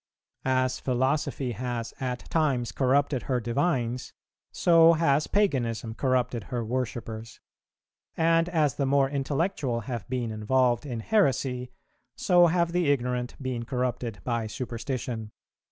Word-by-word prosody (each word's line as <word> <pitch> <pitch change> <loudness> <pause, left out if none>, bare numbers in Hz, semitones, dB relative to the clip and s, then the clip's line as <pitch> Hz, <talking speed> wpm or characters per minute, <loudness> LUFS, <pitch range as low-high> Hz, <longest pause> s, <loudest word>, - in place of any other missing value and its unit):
As 130 0 +1
philosophy 130 0 0
has 120 0 -4
at 125 -2 -4
times 140 -7 +1
corrupted 135 0 +1
her 125 -2 +2
divines, 125 0 -1 0.4
so 165 -1 +6
has 155 -3 +2
paganism 120 - 0
corrupted 125 -2 0
her 120 -3 -3
worshippers; 115 -2 -4 0.8
and 165 +1 +3
as 155 -6 +2
the 140 - 0
more 135 0 +3
intellectual 140 -2 -1
have 120 0 -6
been 120 -3 -2
involved 120 +4 +1
in 120 -4 -4
heresy, 130 - +1 0.5
so 175 -1 +5
have 170 0 +1
the 175 -3 +1
ignorant 125 -2 -1
been 130 -3 -3
corrupted 125 -5 -3
by 115 -3 -1
superstition. 115 0 -4
130 Hz, 120 wpm, -27 LUFS, 120-145 Hz, 0.8 s, so